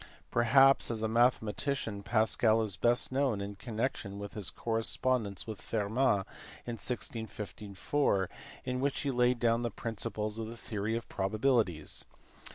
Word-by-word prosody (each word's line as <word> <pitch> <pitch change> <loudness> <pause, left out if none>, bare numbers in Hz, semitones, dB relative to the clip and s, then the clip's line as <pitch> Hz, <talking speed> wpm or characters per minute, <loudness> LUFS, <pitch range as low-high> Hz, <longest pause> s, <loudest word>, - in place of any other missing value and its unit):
Perhaps 135 +4 +5
as 110 -2 -2
a - - +2
mathematician 115 -1 +1
Pascal 110 +1 +3
is 105 -4 -1
best 120 +4 +3
known 130 -5 +1
in 100 +1 -4
connection 110 -1 -3
with 100 0 -7
his 105 -4 -1
correspondence 115 -2 -1
with 110 -3 -7
Fermat 105 -1 +1 0.4
in 120 -1 -4
1654 105 -2 -2 0.4
in 125 0 -2
which 140 +1 0
he 140 - 0
laid 125 -1 +2
down 115 0 +2
the 120 - -1
principles 110 -1 -4
of 110 - -3
the 115 +1 -8
theory 110 0 -2
of 115 - -7
probabilities. 105 - 0
115 Hz, 140 wpm, -32 LUFS, 105-120 Hz, 0.4 s, Perhaps